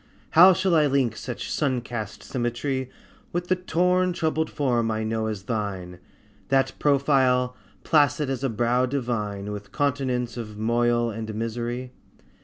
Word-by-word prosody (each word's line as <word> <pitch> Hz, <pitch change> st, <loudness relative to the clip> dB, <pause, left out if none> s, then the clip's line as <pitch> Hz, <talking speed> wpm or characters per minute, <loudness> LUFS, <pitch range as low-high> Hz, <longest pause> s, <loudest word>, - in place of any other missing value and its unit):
How 180 Hz, +4 st, +8 dB
shall 185 Hz, 0 st, +1 dB
I 155 Hz, -2 st, +5 dB
link 135 Hz, -5 st, +1 dB
such 125 Hz, 0 st, -6 dB
sun 130 Hz, -5 st, 0 dB
cast 115 Hz, -4 st, -6 dB
symmetry 130 Hz, +2 st, -2 dB, 0.4 s
With 175 Hz, +1 st, -3 dB
the 185 Hz, -, +4 dB
torn 180 Hz, +1 st, +1 dB
troubled 160 Hz, -1 st, 0 dB
form 120 Hz, -5 st, 0 dB
I 110 Hz, 0 st, -1 dB
know 110 Hz, 0 st, -1 dB
as 105 Hz, -3 st, -4 dB
thine, 95 Hz, -5 st, -4 dB, 0.5 s
That 135 Hz, 0 st, +2 dB
profile, 130 Hz, -3 st, +3 dB, 0.3 s
placid 145 Hz, -2 st, +3 dB
as 135 Hz, -1 st, -3 dB
a 135 Hz, -, +1 dB
brow 120 Hz, +3 st, +1 dB
divine, 105 Hz, -6 st, -3 dB
With 105 Hz, 0 st, -7 dB
continents 130 Hz, -4 st, -1 dB
of 105 Hz, -3 st, -6 dB
moil 120 Hz, +1 st, +1 dB
and 110 Hz, 0 st, -5 dB
misery? 120 Hz, +3 st, -3 dB
125 Hz, 145 wpm, -25 LUFS, 115-145 Hz, 0.5 s, How